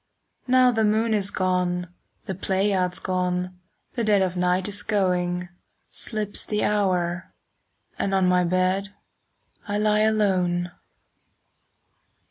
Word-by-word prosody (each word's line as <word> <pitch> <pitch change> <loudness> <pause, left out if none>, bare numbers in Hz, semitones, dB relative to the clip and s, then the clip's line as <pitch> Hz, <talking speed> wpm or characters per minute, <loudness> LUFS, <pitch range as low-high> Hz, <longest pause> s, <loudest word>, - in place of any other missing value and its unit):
Now 255 0 +5
the 225 -2 +1
moon 220 +2 +2
is 200 -2 +1
gone, 180 -2 -1 0.3
the 190 - -3
Pleiads 190 -1 0
5 - - -11
Gone, 180 -1 -2 0.3
the 235 - -2
dead 205 -3 +3
of 185 -1 -2
night 180 +1 +1
is 205 0 -1
going; 180 -3 0 0.4
Slips 215 -2 -1
the 210 -1 -1
hour, 180 -3 0 0.7
and 195 - 0
on 190 -1 +3
my 180 0 +3
bed 185 +3 0 0.7
I 205 0 -1
lie 210 0 +2
alone. 185 -5 +1
190 Hz, 120 wpm, -24 LUFS, 180-210 Hz, 0.7 s, Now